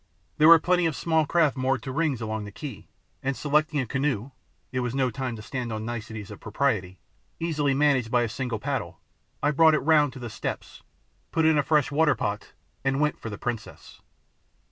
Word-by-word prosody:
There 155 - +7
were 165 0 +10
plenty 180 +1 +2
of 160 - -2
small 160 -1 +1
craft 155 -4 +3
moored 130 -2 0
to 130 - -5
rings 145 -4 0
along 110 -1 -3
the 105 - -8
quay, 130 +1 -8 0.3
and 135 0 -2
selecting 150 +1 +1
a 130 - 0
canoe 135 -1 -1 0.4
it 130 - -1
was 125 0 -2
no 130 -2 +1
time 125 0 -4
to 110 - -9
stand 125 -1 -4
on 110 0 -4
niceties 110 -3 -6
of 105 - -9
property 95 -10 -1 0.4
easily 150 -4 0
managed 135 -5 +2
by 120 0 +3
a - - 0
single 120 +1 -3
paddle, 130 - -4 0.4
I 145 - +3
brought 160 +1 +5
it - - +2
round 150 -4 +4
to - - -9
the 120 -3 -6
steps, - - -5 0.5
put 160 - +2
in 160 0 +5
a - - +5
fresh 150 -1 +2
water 150 +1 +3
pot, 105 +1 -4 0.3
and 135 0 +1
went 150 0 +1
for 115 - -6
the 100 - -6
princess. 120 -3 -6
135 Hz, 205 wpm, -26 LUFS, 115-150 Hz, 0.5 s, were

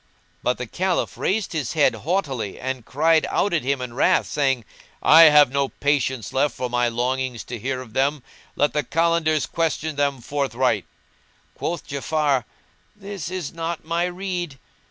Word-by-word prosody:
But 125 - 0
the 125 - -4
Caliph 180 +8 -1
raised 205 -1 -1
his 150 -7 -2
head 150 -3 +4
haughtily 140 - -2
and 130 -2 -4
cried 160 +3 +3
out 200 - +1
at 165 - +2
him 135 +1 -1
in 125 -2 -5
wrath, 130 - +3
saying, 135 -5 0 0.4
"I 165 +2 +9
have 150 -4 +7
no 140 0 0
patience 130 -6 -1
left 140 +2 +1
for 125 -1 -3
my 120 0 +2
longing 125 +1 -1
to 120 +1 -7
hear 130 +3 -3
of 115 -4 -12
them: 135 +1 +1 0.3
let 145 - +1
the 150 - +1
Kalandars 165 0 +1
question 160 -2 -2
them 140 -2 +1
forthright." 130 -1 0 0.7
Quoth 170 +1 -4
Ja'afar, 140 -2 0 0.5
"This 200 -5 -6
is 185 -5 -5
not 165 0 -4
my 170 +2 0
rede." 180 -4 -4
145 Hz, 160 wpm, -23 LUFS, 130-165 Hz, 0.7 s, I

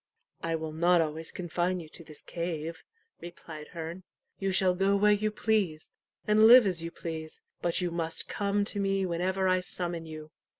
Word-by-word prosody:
"I 165 0 -1
will 160 -1 -4
not 175 +2 +4
always 160 0 -2
confine 180 +1 -1
you 165 - -9
to 165 - -12
this 155 -2 -7
cave," 165 -1 -4 0.4
replied 165 -3 -9
Herne. 170 +1 -7 0.4
"You 195 0 0
shall 185 -1 +4
go 195 +2 +2
where 210 +1 +4
you 210 +1 +2
please, 210 -7 -1 0.3
and 215 +1 +6
live 245 0 +9
as 180 -4 +1
you 165 - -3
please, 160 -2 -7 0.2
but 170 0 +1
you 175 -1 -1
must 165 -1 -2
come 200 0 0
to 205 - -2
me 195 -1 +1
whenever 185 +2 0
I 185 0 +3
summon 175 -2 -4
you." 155 -1 -9
175 Hz, 180 wpm, -29 LUFS, 165-195 Hz, 0.4 s, live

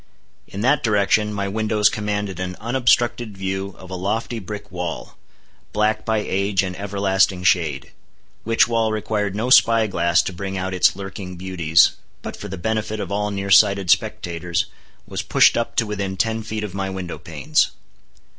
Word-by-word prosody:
In 100 - -6
that 135 +5 +3
direction 105 0 +2
my 100 -1 -2
windows 105 +1 +2
commanded 105 -3 -2
an 90 0 -4
unobstructed 120 -2 +1
view 95 0 -3
of 95 0 -12
a - - -3
lofty 110 +5 -2
brick 105 0 -8
wall, 90 -2 -5 0.6
black 105 +1 +1
by 110 0 +1
age 100 -1 0
and 90 -1 -4
everlasting 95 -1 +1
shade; 75 -8 +1 0.5
which 115 +1 +3
wall 115 -2 +1
required 105 -2 -2
no 115 +4 -2
spy 115 -2 +6
glass 85 -3 +2
to 95 - -4
bring 95 +2 -5
out 95 0 -3
its 90 - +3
lurking 95 -1 -7
beauties, 85 -3 +3 0.3
but - - -6
for 105 - -8
the 95 -1 -6
benefit 110 +3 -2
of - - -5
all 105 +1 -1
near 100 -1 -4
sighted 100 -3 +5
spectators, 85 +2 0 0.4
was - - -4
pushed - - +4
up 115 - -2
to 115 - +2
within 100 -2 -4
ten 110 +4 0
feet 110 0 -4
of 105 -4 -5
my 95 0 -3
window 95 -2 -6
panes. - - 0
100 Hz, 170 wpm, -21 LUFS, 95-110 Hz, 0.6 s, spy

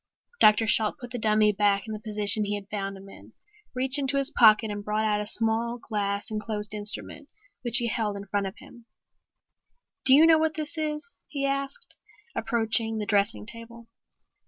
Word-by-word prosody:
Dr. 215 +1 +6
Shalt 215 +2 +2
put 245 -3 -10
the 245 - -4
dummy 215 -1 +3
back 200 -1 +1
in 220 - -6
the 215 - -6
position 210 0 +1
he 205 0 -2
had 200 -1 -8
found 195 -1 -4
him 195 +1 -13
in, 195 - -15 0.4
reached 260 +2 +1
into 275 0 +1
his 275 +2 +3
pocket 215 -1 +5
and 205 0 -5
brought 215 +1 -1
out 210 -1 +1
a 210 - -5
small 230 +2 0
glass 205 -3 -3
enclosed 210 -1 -2
instrument 215 +7 -6 0.3
which 240 -1 +2
he 240 - +1
held 215 -3 -2
in 200 - -8
front 200 0 -2
of 190 - -9
him. 235 -1 -16 1.2
"Do 265 - +7
you 310 +3 +7
know 325 -1 +6
what 315 -1 0
this 310 0 -4
is?" 310 +7 -4
he 280 -2 -3
asked, 275 0 -4 0.4
approaching 225 -1 0
the 210 - -3
dressing 205 0 +1
table. 230 +1 -10
220 Hz, 185 wpm, -26 LUFS, 210-245 Hz, 1.2 s, Do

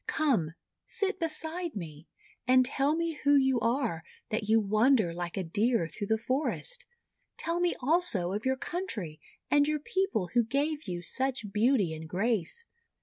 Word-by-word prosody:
Come, 220 - +1 0.3
sit 395 -1 -1
beside 330 0 -2
me, 160 -4 -7 0.4
and 255 0 +6
tell 275 +3 +1
me 330 -2 -2
who 285 0 +5
you 265 -2 +3
are, 230 - 0 0.3
that 215 -1 -2
you 225 +1 +6
wander 215 -2 +3
like 175 +1 -5
a 190 - 0
Deer 205 +2 +1
through 185 +6 -5
the 220 - +2
forest. 300 - -1 0.5
Tell 335 +1 -1
me 350 0 +1
also 255 - +2
of 210 +2 -3
your 265 0 +1
country, 235 - -4 0.3
and 290 0 +5
your 305 0 +1
people 380 - -1
who 240 -1 +4
gave 290 +5 -1
you 175 -1 -4
such 255 0 -2
beauty 210 -5 +3
and 160 0 -8
grace. 220 - -1
250 Hz, 160 wpm, -30 LUFS, 195-305 Hz, 0.5 s, and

